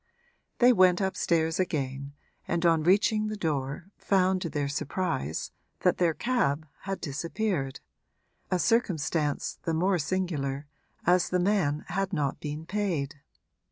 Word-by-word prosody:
They 250 0 +6
went 185 -4 +5
upstairs 170 -4 +1
again 140 -5 -2 0.3
and 170 0 0
on 165 -2 +4
reaching 210 +5 +3
the 215 0 -4
door 155 +1 -2
found 185 -1 +2
to 170 - -2
their 145 -2 -1
surprise 140 - -2 0.3
that - - +2
their 170 -3 +3
cab 160 - 0 0.2
had 195 - -2
disappeared 160 -1 -2 0.7
a 185 - +2
circumstance 165 -9 0
the 165 - -1
more 180 +2 +2
singular 150 -5 -2 0.4
as 180 +1 +4
the 180 - +1
man 175 -6 +1
had 195 +2 -1
not 145 -5 -1
been 150 +1 -5
paid. 170 -7 -2
170 Hz, 130 wpm, -28 LUFS, 145-190 Hz, 0.7 s, They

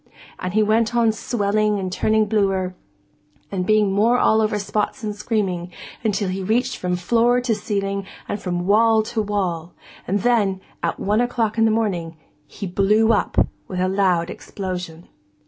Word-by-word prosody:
And 185 +2 -4
he 215 - +4
went 220 +2 +2
on 230 -2 +4
swelling 210 -1 0
and 185 -2 -3
turning 215 +3 +2
bluer, 195 -3 0 0.8
and 185 -2 -2
being 215 -2 +3
more 225 +5 +3
all 220 -2 +3
over 215 -1 +1
spots 210 +4 -2
and 210 -1 -3
screaming, 195 -5 -2 0.3
until 205 -3 0
he 190 +1 -3
reached 240 +6 0
from 180 0 -1
floor 235 +7 +2
to 245 -2 0
ceiling 200 -2 -2 0.2
and 205 - -4
from 175 -1 -2
wall 220 +2 +4
to 220 0 -2
wall; 180 -5 -2 0.3
and 200 +2 0
then, 210 -5 +2 0.2
at - - -2
one 210 +3 +1
o'clock 230 -2 0
in 225 - +5
the - - +4
morning, 185 -7 -1 0.3
he 200 - -7
blew 210 +5 +3
up 210 - +2 0.2
with 185 - -4
a 185 - +2
loud 185 -3 +1
explosion. 180 -4 -6
205 Hz, 165 wpm, -21 LUFS, 185-220 Hz, 0.8 s, in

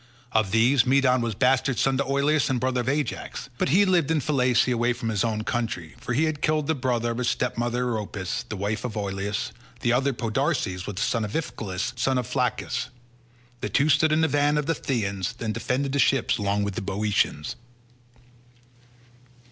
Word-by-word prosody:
Of 110 -3 +2
these, 115 +4 +4
Medon 130 -1 +3
was 115 -3 -2
bastard 130 +2 +2
son 135 -1 +2
to 140 - +1
Oileus 140 +2 +2
and 130 -2 +1
brother 130 0 0
of 120 - -2
Ajax, 145 -1 -3
but - - +1
he 190 +8 +5
lived 175 -6 +2
in 160 -1 +2
Phylace 125 -4 +2
away 120 +1 +1
from 120 -1 -4
his 105 -1 0
own 110 -2 -1
country, 110 -10 -3
for 125 - -3
he 145 +7 +2
had 155 -2 -1
killed 155 -1 +1
the 160 - +1
brother 125 -4 0
of 115 - -4
his 125 - +1
stepmother 120 0 -1
Eriopis, 110 -1 -3
the 110 - -4
wife 105 +3 -2
of 115 -3 -4
Oileus; 100 0 -2 0.3
the 120 - +2
other, 135 +3 +2
Podarces, 115 - -1
was 105 - -5
the 100 - -3
son 115 -2 0
of 105 - -4
Iphiclus, 110 - -3
son 130 +2 +2
of 125 - -1
Phylacus. 125 +1 -1 0.7
These - - -4
two 145 +2 +3
stood 155 +1 +4
in 155 +1 +3
the 160 - +4
van 145 +1 +2
of 150 - 0
the 165 - +1
Phthians, 100 - -2
and 110 -2 -2
defended 135 +5 -1
the 140 - 0
ships 130 -4 +2
along 100 0 0
with 100 -1 -2
the - - -4
Boeotians. 95 -6 -1
125 Hz, 195 wpm, -25 LUFS, 110-140 Hz, 0.7 s, he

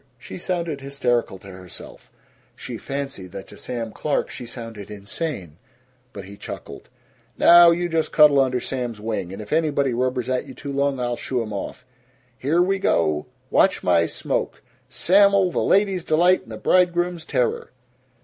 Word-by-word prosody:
She 130 - -9
sounded 170 -5 -3
hysterical 125 -7 -1
to 95 +1 -13
herself; 90 -2 -12 0.4
she - - -7
fancied 135 -10 -6
that 95 - -7
to - - -12
Sam 115 -3 -5
Clark 150 +5 -2
she 120 - -8
sounded 115 -4 -9
insane. 100 - -5 0.5
But 100 -6 -9
he 100 +1 -11
chuckled, - - -9 0.5
"Now 175 0 +8
you 175 +1 +1
just 165 -2 -1
cuddle 150 -2 +6
under 130 -2 +2
Sam's 120 -4 -4
wing, 105 -4 -3
and 95 - -8
if 105 - -6
anybody 145 -5 +1
rubbers 125 0 -1
at 130 -1 -1
you 130 - -10
too 140 - -7
long, 140 -1 0
I'll 120 -1 -2
shoo 125 -3 -2
'em 110 -1 -7
off. 115 +5 -6 0.5
Here 155 +8 +2
we 195 +1 0
go! 75 - +1 0.2
Watch - - +3
my 85 -2 +3
smoke - - -3 0.3
Sam'l, 200 0 +4
the - - -1
ladies' 195 -3 +2
delight 175 +4 +3
and - - -15
the - - -6
bridegrooms' 175 -1 +2
terror!" 125 -5 -1
130 Hz, 165 wpm, -23 LUFS, 110-165 Hz, 0.5 s, Now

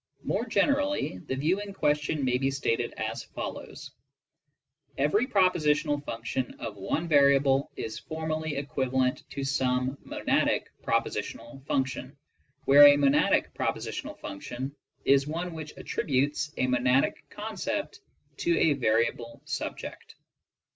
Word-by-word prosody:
More - - -1
generally, 290 - +1
the 130 - -4
view 165 +9 +1
in 200 -1 -7
question 150 -3 +1
may 125 0 +2
be 135 0 +1
stated 135 -4 -1
as - - -3
follows: - - -7 1.1
''Every 200 - +2
propositional 150 - +2
function 125 +1 -3
of 105 - -5
one 130 - -2
variable 140 -2 +4
is 110 - -5
formally 160 -1 -3
equivalent 130 -2 0
to 140 - -4
some 130 -1 0
monadic - - +1 0.2
propositional 115 +3 -2
function," 130 +1 -2 0.5
where 145 +1 +9
a 145 0 +7
monadic 140 0 +3
propositional - - -3
function 125 +8 -6 0.3
is 140 0 +4
one 170 +3 -3
which 155 -2 -8
attributes 145 +2 -1
a - - +2
monadic 125 +1 +2
concept - - -4 0.4
to 170 -1 +1
a 155 - +4
variable 115 -2 0
subject. - - -6
140 Hz, 120 wpm, -28 LUFS, 130-155 Hz, 1.1 s, where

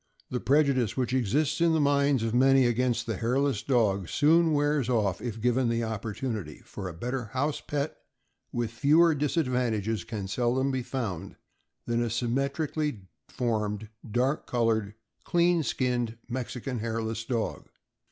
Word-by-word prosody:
The 125 - -1
prejudice 135 -5 +2
which 125 -1 0
exists 130 - +1
in 170 -1 +4
the 160 - +2
minds 140 -3 +3
of 115 -1 -1
many 135 +1 +5
against 120 0 +1
the 115 -5 -3
hairless 125 0 +1
dog 100 -8 +1
soon 160 +2 +4
wears 145 -3 +1
off 105 -7 +1
if 115 -2 -4
given 125 +2 +2
the 115 0 0
opportunity, 110 - -4
for 95 - -6
a - - -7
better 125 +6 -3
house 135 +7 -2
pet, 145 +1 -3 0.5
with 120 -2 -2
fewer 155 +8 +4
disadvantages, 125 - 0
can 105 -4 -5
seldom 125 +6 +1
be 130 -1 -1
found 115 -9 -4 0.5
than 120 0 0
a 120 - 0
symmetrically 140 +3 -1 0.3
formed, 110 -3 -2 0.2
dark 125 +6 0
colored, 110 -4 0 0.3
clean 175 0 +3
skinned 120 -5 -1
Mexican 125 0 -4
Hairless 115 0 -3
Dog. 115 -2 -3
125 Hz, 140 wpm, -28 LUFS, 115-140 Hz, 0.5 s, many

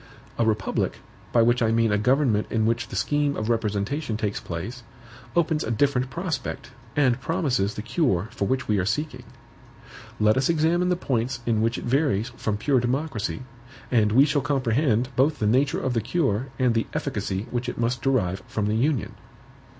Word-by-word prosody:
A 115 - +3
republic, 105 -3 0 0.3
by 115 - +4
which 120 +1 +3
I 115 - +3
mean 115 -1 +2
a 105 - +3
government 125 -2 +2
in 110 -1 +1
which 115 +1 0
the - - -8
scheme 145 -1 0
of 110 +1 -2
representation 110 +3 -1
takes 105 -2 -2
place, 95 +9 -6 0.5
opens 160 -2 +2
a - - -4
different 130 +2 +1
prospect, 165 -4 -4 0.2
and 130 -4 +2
promises 135 - 0
the 105 - -5
cure 120 - +1
for 100 - -2
which 130 +2 -1
we 105 -2 +2
are - - +1
seeking. 125 +3 -2 0.9
Let 105 +2 +4
us 130 +3 +2
examine 170 +2 +2
the 180 - +3
points 125 -6 -2
in 110 -2 +1
which 115 +2 +1
it - - -6
varies 130 -4 +1
from 110 -3 -3
pure 130 +4 +2
democracy, 125 - -2 0.5
and 110 -4 +3
we 130 +6 +6
shall 145 -1 +1
comprehend 130 -3 +1
both 145 +4 +3
the 105 - -1
nature 130 +6 +2
of 130 - -1
the 115 - +1
cure 130 - 0
and 125 -3 +2
the 115 0 0
efficacy 95 +2 -2
which 125 0 -2
it - - -6
must 120 +1 -1
derive 100 -9 +1
from 105 - -2
the 105 +1 0
Union. 135 0 0
120 Hz, 185 wpm, -25 LUFS, 110-140 Hz, 0.9 s, we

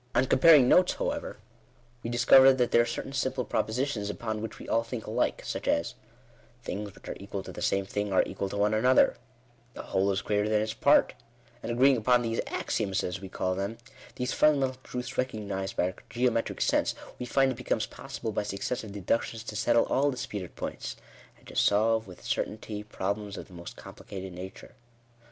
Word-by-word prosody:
On 130 - +4
comparing 140 0 +7
notes, 180 +6 +5
however, - - -3 0.6
we 115 - -4
discover 125 +3 +7
that 125 -2 +1
there 120 - +6
are 120 - 0
certain 125 +3 -5
simple 130 -2 -1
propositions 110 0 -1
upon 110 0 -4
which 110 -1 -6
we - - -10
all 115 - +2
think 115 -1 -6
alike, - - -1
such - - -4
as 85 - +1 0.3
" - - -30
Things 100 0 -5
which - - -15
are - - -4
equal 100 0 -5
to - - -8
the - - -8
same 100 0 +1
thing 105 +1 -3
are 95 - +4
equal 95 0 -4
to 100 - -5
one 105 +1 +2
another;" 125 +4 +4 0.6
"The - - -6
whole 95 +1 +1
is 95 - -1
greater 105 0 0
than 105 0 +2
its 110 0 -3
part;" - - +4 0.5
and 115 - -4
agreeing 130 +3 +5
upon 120 +2 +3
these 115 0 -1
axioms 95 -1 -1
as 90 +1 -4
we 95 - -8
call 95 0 -1
them 100 +4 -3 0.2
— 130 - -19
these 125 0 -2
funda 150 -2 +4
mental 130 -1 -2
truths 125 +1 -5
recognised 100 -6 -3
by - - +1
our - - -20
geometric 120 -1 0
sense, - - +2 0.2
we 125 - -4
find 135 +2 +3
it - - -4
becomes 115 -3 -1
possible 120 -4 -6
by - - -1
successive 105 +2 -4
deductions 110 +3 -1
to 110 - -7
settle 115 +2 +3
all 140 +2 +2
disputed 105 -8 -5
points, - - -5 0.4
and - - -24
to - - -11
solve 110 +1 +3
with 90 - -12
certainty, 105 -1 -3
problems 105 0 -4
of - - -7
the 95 - -18
most 85 0 -9
com - - -11
plicated 95 -1 -8
nature*. 90 +2 -9
110 Hz, 200 wpm, -28 LUFS, 100-125 Hz, 0.6 s, comparing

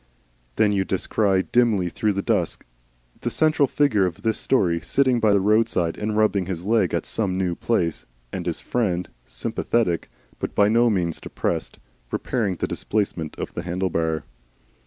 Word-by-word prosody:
Then 105 -1 +3
you 100 -2 +1
descry 95 0 +1
dimly 115 -7 +2
through 105 +4 0
the 100 0 -2
dusk - - 0 0.5
the - - -2
central 155 -2 +3
figure 115 -10 +2
of 90 +3 -7
this 110 -1 0
story 85 -10 +2
sitting 130 -3 +2
by 110 -2 +3
the 100 - +4
roadside 105 -4 +2
and 105 0 -2
rubbing 100 -4 +2
his 90 -2 -4
leg 110 -5 +2
at - - -1
some 95 -4 -1
new 90 -2 0
place, 85 -4 -1 0.3
and - - -4
his - - -2
friend, 95 -7 -1 0.2
sympathetic 100 -8 -1 0.3
(but - - -4
by 100 0 +4
no 120 +2 +4
means 90 -6 -1
depressed), - - -3 0.3
repairing 105 -7 -1
the - - -2
displacement 95 -7 -2
of - - -5
the - - -3
handle 90 +2 -2
bar. 80 -1 0
100 Hz, 165 wpm, -23 LUFS, 90-110 Hz, 0.5 s, the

